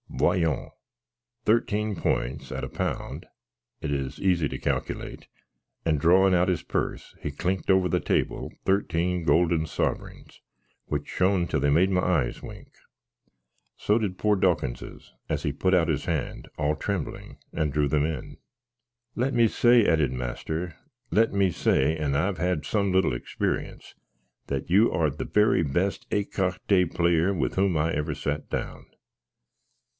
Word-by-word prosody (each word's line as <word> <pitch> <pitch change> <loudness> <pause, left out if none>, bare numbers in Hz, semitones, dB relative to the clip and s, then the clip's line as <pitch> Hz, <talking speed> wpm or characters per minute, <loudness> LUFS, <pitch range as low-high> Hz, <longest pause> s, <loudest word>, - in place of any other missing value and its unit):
Voyons: 85 -6 0 0.7
thirteen 110 -2 +1
points, 70 -4 -2
at - - -4
a - - -4
pound - - -4 0.5
it - - -3
is 70 -2 -3
easy 90 -5 +2
to - - -5
calculate;" - - -3 0.6
and, 80 -3 +2
drawin 95 +5 +5
out 90 0 +3
his 90 -3 0
puss, - - -3
he 75 - -3
clinked 90 +6 -2
over 95 -1 +4
the 80 - +1
table - - -1
13 90 -2 +1
goolden 80 +1 +3
suverings, - - -4 0.4
which 75 -1 -3
shon 95 -2 +1
till - - 0
they 70 - +2
made 85 +6 +4
my 90 -1 +2
eyes 85 -10 0
wink. - - -10 1.1
So 105 - +2
did 100 -5 -2
pore 105 +1 +2
Dawkinses, 85 -10 -2 0.2
as - - -1
he - - 0
put 95 0 0
out 85 -3 +4
his - - -1
hand, - - -3
all 75 0 +1
trembling, 95 0 -4 0.2
and 75 -2 0
drew 75 -1 +2
them 75 +1 +1
in. 80 -5 -5 0.8
"Let 130 +3 0
me 115 -1 +5
say," 120 0 +4
added 80 -6 +2
master, 80 +7 -4 0.4
"let 115 +2 +3
me 100 -2 +2
say 75 -1 +2
(and 75 -3 -1
I've 90 +4 0
had 90 -1 -1
some 100 -3 0
little 95 -7 +2
experience), - - -4 0.5
that 70 +2 -3
you 100 +6 +5
are 80 -2 +1
the 75 - -5
very 105 -4 +3
best 85 +7 -1
écarté 95 -2 0
player 85 +2 +2
with 75 -9 -1
whom 95 -3 +2
I 80 +2 +1
ever 75 +1 -1
sat 75 0 -3
down." - - -4
85 Hz, 150 wpm, -26 LUFS, 75-95 Hz, 1.1 s, drawin